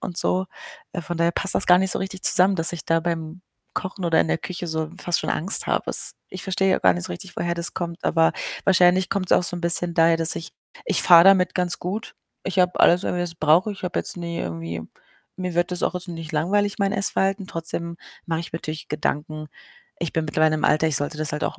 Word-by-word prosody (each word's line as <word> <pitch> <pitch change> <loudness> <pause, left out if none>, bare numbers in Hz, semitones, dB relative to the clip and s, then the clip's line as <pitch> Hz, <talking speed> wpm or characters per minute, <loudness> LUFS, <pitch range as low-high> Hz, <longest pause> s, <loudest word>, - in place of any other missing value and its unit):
und 175 - -6
so. 185 +1 0 0.5
Äh, 175 - -4
von 175 +1 -5
daher 170 0 +2
passt 195 - -1
das - - +1
gar 180 - +7
nicht 190 -1 +1
so - - -2
richtig 190 0 -5
zusammen, 190 +2 +4
dass 165 +1 +1
ich 165 - -6
da 165 0 +2
beim 165 +1 -4 0.3
Kochen 185 0 -4
oder 165 -1 +3
in - - 0
der - - 0
Küche 180 +1 -6
so 160 0 -3
fast 175 -3 0
schon - - -5
Angst 175 +5 0
habe. - - -1
Es - - -1 0.2
ich 185 - -7
verstehe 190 0 +1
gar 90 -1 +4
nicht 85 - -3
so - - -6
richtig, 85 - -9
woher 170 0 -1
das 170 0 -3
kommt, 170 -1 -5
aber 165 -1 +3 0.3
wahrscheinlich 185 -1 +4
kommt's 195 -2 -1
auch - - +4
so 175 - +1
'n - - -6
bisschen 170 0 +1
daher, 165 0 +4
dass 165 0 +3
ich 165 +1 -7 0.3
ich - - +2
fahre 170 -1 +8
damit 190 -1 +5
ganz 180 -1 +1
gut. 200 +5 -5 0.3
Ich 190 0 -3
habe 180 0 +1
alles, 175 +2 +5
irgendwe 175 - -1
was 175 - -3
ich 165 - -27
brauche. 165 +7 +3
Ich 195 - -12
habe 180 - -2
jetzt - - -4
nie 170 -1 -5
irgendwie 85 0 -5 0.5
mir 180 -2 -4
wird 175 +1 0
das 180 - -1
auch - - 0
jetzt 180 +1 -1
nicht 165 -2 -7
langweilig, 200 +6 0
mein 200 -1 +1
Essverhalten. 195 -1 0
Trotzdem 170 0 -5 0.3
mache 165 -1 -1
ich 170 - -9
mir 165 - -3
natürlich 155 -1 -6
Gedanken. 150 0 -3 0.5
Ich 170 - -3
bin 160 - -1
mittlerweile 155 +1 +2
im - - -4
Alter, 155 +1 +3
ich 150 - +1
sollte 145 +2 -3
das 155 -1 -2
halt 150 - -2
auch - - -3
170 Hz, 245 wpm, -23 LUFS, 160-185 Hz, 0.5 s, fahre